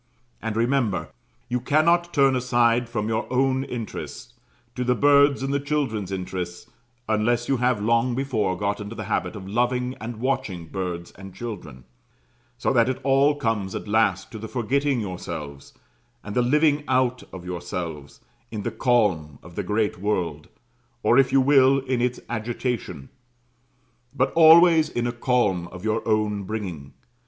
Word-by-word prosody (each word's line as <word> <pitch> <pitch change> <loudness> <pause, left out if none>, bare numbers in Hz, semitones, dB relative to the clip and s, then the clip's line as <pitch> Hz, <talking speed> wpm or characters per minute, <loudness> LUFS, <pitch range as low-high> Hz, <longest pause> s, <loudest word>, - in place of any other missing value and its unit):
And 110 -1 -3
remember, 120 -4 0 0.4
you 125 0 -1
cannot 170 +6 +2
turn 135 -3 +3
aside 120 -1 +2
from 110 -2 -2
your 110 +2 -2
own 130 +1 +2
interests, 120 -1 -7 0.4
to 125 - -3
the 125 0 +2
birds' 140 +1 +4
and 135 +1 -1
the 140 - +1
children's 135 -9 -2
interests, 90 -2 -5 0.4
unless 115 +2 +1
you 135 - +1
have 125 -2 +1
long 115 +2 +2
before 115 -8 -1
got 100 +1 -2
into 105 +2 -7
the 110 - -5
habit 95 -3 -2
of 95 -2 -8
loving 125 +4 0
and 115 +1 -6
watching 120 -9 -2
birds 85 -1 -5
and 95 0 -12
children; 90 - -7 0.7
so 125 - 0
that 120 -1 +4
it 130 - -2
all 140 +2 +3
comes 110 -8 -2
at - - -5
last 105 -2 +1
to 110 - -7
the 110 - -6
forgetting 135 +2 0
yourselves, 85 -7 -7 0.5
and 100 - -7
the 125 - +3
living 150 +3 +3
out 125 -1 +1
of 90 -2 -9
yourselves, 85 -5 -6 0.3
in 105 -2 -5
the 120 - -2
calm 105 - +1
of 90 - -13
the 105 - -3
great 105 0 -1
world, 95 -4 -2 0.6
or 120 - +5
if 130 -2 +3
you 135 - +5
will, 135 0 +5
in 130 -2 -1
its 125 0 0
agitation; 120 - -4 1.1
but 130 0 +1
always 165 -1 +7
in 120 - -2
a 120 - 0
calm 120 -8 0
of 90 +1 -11
your 110 +1 0
own 105 -2 +1
bringing. 95 -9 -6
115 Hz, 160 wpm, -24 LUFS, 100-130 Hz, 1.1 s, always